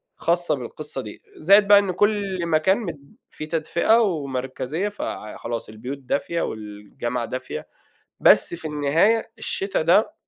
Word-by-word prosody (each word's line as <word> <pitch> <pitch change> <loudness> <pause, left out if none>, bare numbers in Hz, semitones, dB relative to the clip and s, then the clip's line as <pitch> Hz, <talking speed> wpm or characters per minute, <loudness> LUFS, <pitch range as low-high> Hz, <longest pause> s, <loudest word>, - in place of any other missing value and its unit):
خاصة 175 0 +1
بالقصّة 135 +2 -5
دي. 105 -4 -10 0.2
زائد 200 +5 +5
بقى 205 0 +8
إن 200 -2 -1
كل 200 -2 0
مكان 165 +4 +3
مد 160 -10 -8
في 155 - -7
تدفئة 170 +8 +2
ومركزية 145 - -2
فع 110 - -6
خلاص 115 -1 -5
البيوت 125 +6 -7
دافية 140 +5 -2
والجامعة 110 +3 -5
دافية، 130 +2 -6 0.5
بس - - +5
في 170 -1 -7
النهاية 160 +11 +2
الشتا 195 -6 -1
ده 195 - +3
160 Hz, 135 wpm, -23 LUFS, 130-195 Hz, 0.5 s, بقى